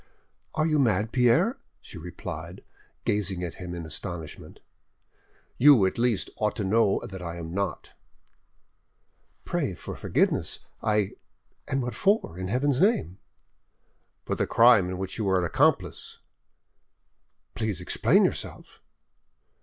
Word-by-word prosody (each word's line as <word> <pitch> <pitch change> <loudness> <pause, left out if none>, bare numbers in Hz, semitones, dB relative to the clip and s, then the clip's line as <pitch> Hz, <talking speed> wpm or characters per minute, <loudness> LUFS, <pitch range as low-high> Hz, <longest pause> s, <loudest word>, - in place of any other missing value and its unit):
"Are 155 0 +2
you 155 -2 +2
mad, 110 -4 +2
Pierre?" 130 - +3 0.2
she 90 - -11
replied, 85 +1 -8 0.4
gazing 95 -3 0
at 85 - -4
him 90 -1 -5
in 85 -1 -6
astonishment. 80 0 -7 1.0
"You, 135 -7 +7
at 95 - -1
least, 120 -4 0
ought 105 -1 0
to 105 - -2
know 100 +1 +3
that 95 -1 -8
I 85 -1 -5
am 85 -1 -7
not." 100 +1 -3 1.5
"Pray - - -1
for - - -8
forgiveness—I—! 105 -3 -1 0.6
and 135 -1 -1
what 125 - -3
for, 200 - +1
in 95 - -3
Heaven's 130 - +1
name?" 195 - +1 1.1
"For - - -2
the - - -1
crime 115 -6 +5
in 90 - -4
which 95 +3 -5
you 105 -3 0
are 95 - +3
an 90 - +1
accomplice." - - 0 1.4
"Please 105 -5 -2
explain 90 - +3
yourself." - - -5
100 Hz, 130 wpm, -26 LUFS, 90-125 Hz, 1.5 s, You